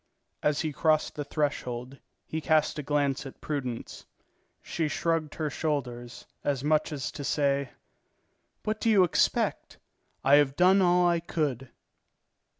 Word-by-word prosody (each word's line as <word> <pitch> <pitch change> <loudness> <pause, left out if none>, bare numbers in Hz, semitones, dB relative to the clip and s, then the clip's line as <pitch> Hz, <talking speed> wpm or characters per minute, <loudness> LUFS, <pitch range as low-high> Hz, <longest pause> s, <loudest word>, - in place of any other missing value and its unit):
As 150 -1 +1
he 155 -3 -2
crossed 155 +1 +2
the 145 - -4
threshold, 135 -3 -3 0.3
he 160 - -4
cast 155 -1 +2
a - - -1
glance 145 -1 0
at 135 - -12
Prudence. 130 -6 -5 0.6
She 160 -2 -2
shrugged 160 0 -1
her 155 -2 -2
shoulders, 125 -6 -3 0.2
as 140 -2 -1
much 155 +1 +2
as 140 -4 -4
to 150 -2 -7
say: 140 -2 +1 0.9
"What 215 0 -2
do 230 - +2
you 205 -4 +6
expect? 175 - 0 0.5
I 140 +2 +6
have 140 -2 +3
done 185 +3 +5
all 180 -1 +4
I 170 -1 +2
could." 145 -6 -2
150 Hz, 145 wpm, -28 LUFS, 140-160 Hz, 0.9 s, you